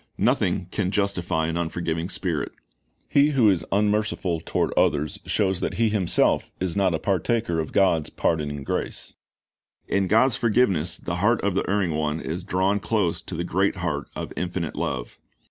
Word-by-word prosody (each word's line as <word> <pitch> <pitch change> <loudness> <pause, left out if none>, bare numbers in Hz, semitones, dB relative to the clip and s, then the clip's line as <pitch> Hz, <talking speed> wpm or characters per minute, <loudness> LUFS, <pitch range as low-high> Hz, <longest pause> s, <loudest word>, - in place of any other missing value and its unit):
" - - -39
Nothing 90 - 0
can 100 -4 -1
justify 95 -5 0
an 85 +1 -2
unforgiving 85 0 -2
spirit. 85 -6 -2 0.5
He 140 0 +4
who 115 -6 +5
is 90 - 0
unmerciful 105 -4 +1
toward - - -1
others 75 +1 +1
shows 95 -4 +1
that - - -2
he 115 0 +2
himself 100 -5 +2
is 90 -1 -2
not 95 -4 +2
a - - +1
partaker 100 +1 0
of 80 - -3
God's 90 -6 +2
pardoning 75 -3 -1
grace. - - -4 0.7
In 100 -1 +1
God's 115 +6 +4
forgiveness 105 -8 +2
the 85 0 -4
heart 105 +5 +3
of 100 -1 0
the 95 - -1
erring 95 -5 +1
one 75 0 -1
is 85 +3 -4
drawn 95 +2 +1
close 95 -6 0
to 90 - -7
the 85 - -2
great 95 +4 +1
heart 85 -6 -3
of - - -5
Infinite 90 -3 -3
Love. - - -4
90 Hz, 170 wpm, -24 LUFS, 80-100 Hz, 0.7 s, who